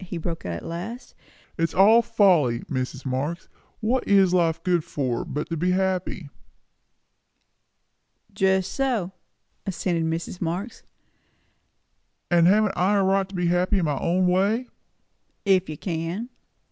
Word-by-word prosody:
he 180 -1 -6
broke 165 - -5
out - - -3
at 85 - -7
last. 185 +9 -7 0.5
"It - - -1
is 165 - -1
all 215 +5 +6
folly. 185 - +3
Mrs. 130 0 -4
Marx, 140 +7 -3 0.3
what 240 +4 0
is 195 -3 +4
life 165 -2 +1
good 175 -3 +1
for, 130 -6 -2
but 150 +2 -4
to 165 - -2
be 180 +4 0
happy?" 185 -4 -1 2.0
"Just 190 -1 +1
so," 245 -10 -1 0.6
assented 175 -3 -1
Mrs. 165 +2 -4
Marx. 180 +7 -4 1.5
"And 170 -1 +5
haven't 210 +1 +3
I 190 +3 +2
a 195 - +3
right 195 0 +1
to 195 - -10
be 180 -1 -1
happy 180 +3 +2
in 180 - +1
my 145 -3 -1
own 180 +2 +1
way?" 200 +7 +1 0.8
"If 190 -3 +3
you 155 - -5
can." 175 - -4
180 Hz, 145 wpm, -24 LUFS, 165-195 Hz, 2.0 s, all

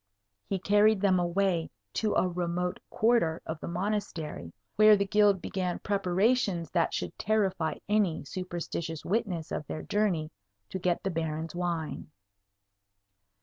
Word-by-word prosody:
He 195 - 0
carried 205 +2 +4
them 190 -2 +3
away 175 -1 +1 0.2
to 215 -2 0
a - - +3
remote 180 0 -2
quarter 220 -8 +2
of 160 -1 -4
the - - -6
Monastery, 175 - -3 0.2
where 215 0 +7
the 200 - +1
Guild 205 -2 +3
began 180 -2 -2
preparations 200 -1 +1
that 170 -2 +2
should - - -3
terrify 195 -7 +1
any 200 -8 +1
superstitious 170 -2 -5
witness 185 -6 -1
of 150 - -3
their - - -5
journey 180 -7 0 0.4
to 190 - -4
get 175 -1 0
the 195 - -1
Baron's 160 -1 -3
wine. 170 -4 -3
180 Hz, 135 wpm, -29 LUFS, 170-205 Hz, 0.4 s, where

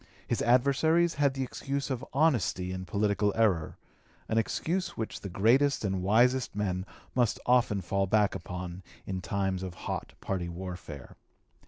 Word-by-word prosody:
His - - 0
adversaries 140 +7 +3
had 140 -2 +1
the 135 - -1
excuse 140 +2 -3
of 130 0 -2
honesty 125 - +1
in 95 0 -5
political 105 +1 +1
error 95 -9 +1 0.5
an 110 - +2
excuse 175 - -2
which 110 - -4
the 100 - -5
greatest 120 +8 +3
and 95 -2 -1
wisest 120 +6 +3
men 95 -2 -2 0.3
must 120 -3 +1
often 120 -5 +3
fall 95 +3 0
back 105 +1 +3
upon 90 0 -6 0.2
in 95 -1 -3
times 95 -1 -1
of 90 -2 -5
hot - - -4
party 90 -3 -3
warfare. 85 -5 -8
105 Hz, 150 wpm, -29 LUFS, 95-130 Hz, 0.5 s, adversaries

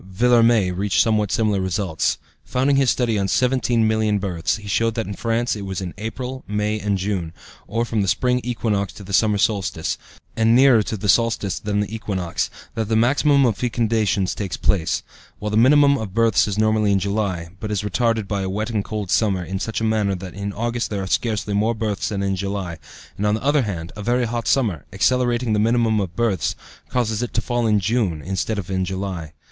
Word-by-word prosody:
Villermé 115 -3 +3
reached 95 -1 0
somewhat 105 -3 +2
similar 105 -3 +1
results. 95 -3 -1 0.3
Founding 135 +2 +1
his 135 -2 +3
study 115 -3 +1
on 100 - 0
17,000,000 110 -4 +2
births, 90 -4 -1
he 105 -1 -9
showed 115 +3 +1
that 115 -2 -1
in 100 - -5
France 115 +3 -1
it 105 - -6
was 95 -2 -4
in 90 -3 -5
April, 125 +4 -5
May, 105 +1 -1
and 100 -1 0
June, 95 -4 -3 0.3
or 115 +4 -1
from 115 -2 -1
the 100 - 0
spring 125 +5 +1
equinox 110 -5 -1
to 100 - -11
the 100 +1 -8
summer 105 +1 +3
solstice, 100 -6 -1 0.4
and 115 +1 +3
nearer 130 -3 +6
to 110 +1 -3
the 105 +1 -4
solstice 105 -2 +2
than 105 0 -1
the 105 +2 -4
equinox, 95 -6 -2 0.2
that 110 -2 -3
the 110 - +2
maximum 140 +4 +4
of 115 -5 +1
fecundations 110 -4 0
takes 100 -3 -4
place; 85 -6 0 0.3
while 105 0 -4
the - - 0
minimum 140 +4 +5
of 105 -3 -6
births 115 -3 +3
is 100 -1 -3
normally 110 -1 +2
in 100 - +3
July, 100 -4 -2
but 110 - -5
is 105 -1 -1
retarded 115 0 0
by 100 -1 -2
a 95 - -2
wet 110 +4 -2
and 105 -3 -1
cold 105 -3 -4
summer 100 -5 +2
in 95 +2 -4
such 110 +2 -3
a - - -1
manner 110 -3 +1
that 90 -1 -8
in 100 +2 -4
August 120 +3 -2
there 100 -2 -3
are - - -3
scarcely 105 +1 -1
more 110 +3 +1
births 110 -3 -2
than 100 -2 -2
in 95 -1 0
July, 95 -3 -4 0.4
and, 105 - 0
on 105 - +2
the 110 - -5
other 145 +1 +3
hand, 85 -7 -4
a 105 - -6
very 120 +3 +1
hot 115 0 -3
summer, 105 - +1
accelerating 120 +4 +1
the 105 - +2
minimum 115 0 +2
of 90 -3 -3
births, 115 -5 0 0.3
causes 110 -3 0
it 120 - -4
to - - +3
fall 120 -1 -1
in 105 -1 +3
June 100 -5 0
instead 95 +3 -2
of 95 -1 -5
in 95 0 0
July. 95 -4 -4
105 Hz, 210 wpm, -21 LUFS, 100-115 Hz, 0.4 s, nearer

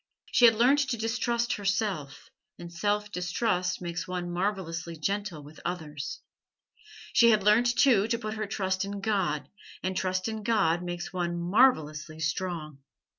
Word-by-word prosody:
She 245 - +6
had 225 -1 +7
learnt 250 +6 +4
to 240 - -1
distrust 235 +1 0
herself, 195 -8 -2 0.3
and 170 0 -9
self 210 +3 -1
distrust 180 0 -1
makes 175 0 -4
one 180 -1 -3
marvellously 175 -3 -3
gentle 195 -1 -3
with 150 +2 -13
others; 155 -4 -5 0.9
she 235 - +6
had 215 -3 +4
learnt, 235 +4 +4
too, 230 -6 +5
to 230 0 0
put 215 -2 -4
her 215 -1 -3
trust 190 -2 -1
in 200 0 -5
God, 195 -8 0 0.4
and 185 0 -1
trust 185 +1 -1
in 220 -1 -4
God 200 -6 +2
makes 175 0 -5
one 175 -1 -2
marvellously 160 - +2
strong. 160 -2 -3
190 Hz, 150 wpm, -28 LUFS, 170-215 Hz, 0.9 s, had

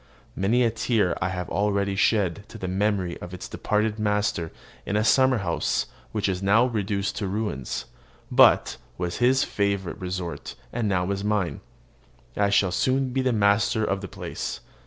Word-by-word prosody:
Many 110 +6 +2
a 115 - +2
tear 110 -5 +1
have 90 -1 -2
I - - -7
already 100 0 +1
shed 100 -1 +1
to - - -10
the 95 - -4
memory 95 -2 0
of 90 +1 -7
its 90 - -7
departed 105 +1 -1
master 105 -5 0 0.3
in 100 - -3
a 105 - +2
summer 130 +2 +4
house 90 -5 0 0.3
which 105 -2 -1
is 95 -1 -1
now 105 +5 +4
reduced 100 -4 -2
to 100 - -2
ruins, 95 - -3 0.5
but - - +5 0.2
was 90 -1 -3
his 130 +2 +4
favourite 100 -3 -2
resort, 90 -2 -5 0.2
and 110 -3 0
now 90 0 0
is 100 0 -2
mine. 105 -4 -1 0.7
I 100 - +2
shall 100 -2 +3
soon 130 - +1
be 135 - +1
master 110 +1 +2
of 100 -1 -1
the 95 - -5
place. - - -5
100 Hz, 165 wpm, -25 LUFS, 95-110 Hz, 0.7 s, but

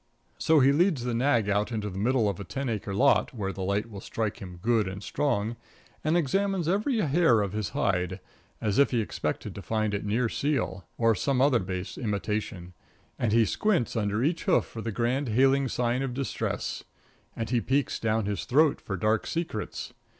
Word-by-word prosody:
So 160 -2 +4
he 135 +2 +6
leads 155 -3 +2
the 125 -1 -1
nag 120 -3 +2
out 105 +3 +1
into 105 -2 -2
the 95 -1 -5
middle 120 +1 +2
of 100 -4 -2
a - - -4
ten 135 +4 -4
acre 105 -3 -3
lot, 135 +2 +3
where 95 -3 -3
the 95 - -7
light 100 +3 0
will 100 -4 -9
strike 110 0 -3
him 90 -2 -8
good 110 +1 +2
and 95 +2 -6
strong, 120 -5 -1 0.5
and 155 +3 +2
examines 190 +3 0
every 210 +8 +1
hair 150 - +4
of 100 -1 -2
his 105 -4 -2
hide, 90 0 0 0.4
as 105 +1 0
if 140 - +5
he 120 - +1
expected 110 - -3
to - - -7
find 110 -1 -1
it 100 - -2
near 115 +4 +1
seal, 115 -8 -1
or 115 -1 +4
some 130 +5 0
other 135 -2 +4
base 95 -1 -5
imitation; 105 -4 -3 0.5
and 115 - +1
he 115 +1 +5
squints 180 - 0
under 105 +1 0
each 165 +3 0
hoof - - +3
for 115 - -8
the 115 - -3
grand 120 +5 0
hailing 135 +4 +3
sign 125 +1 0
of 130 -2 -3
distress; 135 0 -3 0.5
and 115 0 -4
he 120 -2 +2
peeks 135 +6 0
down 110 -1 0
his 100 0 -2
throat 145 +3 +3
for 95 - -4
dark 110 +4 +1
secrets. 160 -11 -4
115 Hz, 195 wpm, -27 LUFS, 105-135 Hz, 0.5 s, he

